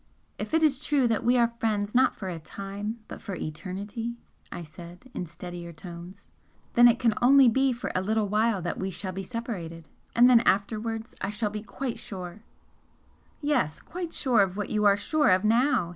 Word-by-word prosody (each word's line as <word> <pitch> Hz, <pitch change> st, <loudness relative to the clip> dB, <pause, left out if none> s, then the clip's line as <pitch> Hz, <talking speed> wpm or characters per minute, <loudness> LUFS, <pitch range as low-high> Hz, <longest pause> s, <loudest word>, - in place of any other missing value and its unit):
"If -, -, -2 dB
it 320 Hz, -, +3 dB
is 295 Hz, -2 st, +3 dB
true 280 Hz, -4 st, +2 dB
that 225 Hz, -2 st, 0 dB
we 245 Hz, +2 st, +3 dB
are 235 Hz, -1 st, +3 dB
friends 210 Hz, -2 st, -1 dB
not 255 Hz, +1 st, +4 dB
for 190 Hz, -, -6 dB
a 175 Hz, -3 st, -4 dB
time 200 Hz, +7 st, -6 dB
but -, -, -9 dB
for 195 Hz, -, -5 dB
eternity" 200 Hz, +9 st, -5 dB, 0.4 s
I 175 Hz, -, -6 dB
said, 175 Hz, +9 st, -12 dB
in 180 Hz, -, -4 dB
steadier 175 Hz, +1 st, -8 dB
tones 175 Hz, +3 st, -11 dB, 0.4 s
"then 240 Hz, 0 st, +8 dB
it 235 Hz, -1 st, +4 dB
can 235 Hz, -3 st, +2 dB
only 265 Hz, +1 st, +7 dB
be 265 Hz, +3 st, +3 dB
for 240 Hz, 0 st, -4 dB
a 185 Hz, -, 0 dB
little 215 Hz, +2 st, 0 dB
while 210 Hz, -2 st, +1 dB
that 175 Hz, -, -3 dB
we 190 Hz, -, -2 dB
shall 190 Hz, 0 st, -5 dB
be 190 Hz, +1 st, -5 dB
separated. 180 Hz, -6 st, -6 dB, 0.3 s
And 240 Hz, +1 st, +7 dB
then 250 Hz, -2 st, +7 dB
afterwards 225 Hz, +2 st, -1 dB
I 195 Hz, -, -1 dB
shall 210 Hz, 0 st, -1 dB
be 210 Hz, 0 st, -5 dB
quite 225 Hz, +5 st, -5 dB
sure 185 Hz, 0 st, -7 dB, 0.5 s
" -, -, -36 dB, 0.3 s
"Yes 290 Hz, -, 0 dB
quite 350 Hz, -1 st, -6 dB
sure 250 Hz, -9 st, +2 dB
of 190 Hz, -1 st, 0 dB
what 205 Hz, -, -3 dB
you 210 Hz, -1 st, +1 dB
are 200 Hz, -1 st, +6 dB
sure 300 Hz, +8 st, +2 dB
of 185 Hz, +1 st, +4 dB
now!" 230 Hz, -4 st, +3 dB
210 Hz, 200 wpm, -27 LUFS, 185-240 Hz, 0.5 s, then